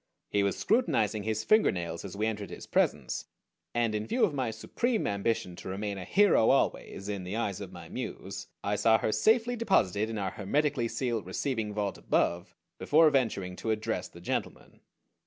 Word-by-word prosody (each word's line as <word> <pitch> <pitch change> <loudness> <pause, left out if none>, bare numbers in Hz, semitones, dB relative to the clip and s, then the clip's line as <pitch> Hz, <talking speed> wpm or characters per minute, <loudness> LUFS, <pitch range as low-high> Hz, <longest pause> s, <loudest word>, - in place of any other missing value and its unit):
He 100 - +2
was 100 -1 0
scrutinizing 115 - +1
his 110 +1 -2
fingernails 85 - +2
as 100 -1 -7
we 105 - 0
entered 105 -3 -3
his - - -8
presence, - - 0 0.4
and 120 -2 +1
in 105 0 -2
view 245 - +1
of 190 -8 +3
my 130 -4 -1
supreme 225 - -1
ambition 100 -2 -1
to - - -7
remain 100 +1 -3
a 90 - -6
hero 195 - +4
always 115 -6 0
in 100 -3 -3
the 90 +3 -4
eyes 105 -5 -2
of - - -7
my - - -10
Muse - - -6 0.2
I 100 +1 0
saw 110 +2 +5
her 110 - -1
safely 230 - +3
deposited 110 - +2
in 115 - -4
our 95 -2 -2
hermetically 135 +4 0
sealed 115 -6 -2
receiving 110 +2 -2
vault 105 -2 -2
above 85 0 0 0.2
before 155 +1 +5
venturing 110 -9 0
to 115 - -4
address 110 0 -1
the - - -14
gentleman. - - -4
110 Hz, 180 wpm, -30 LUFS, 100-135 Hz, 0.4 s, saw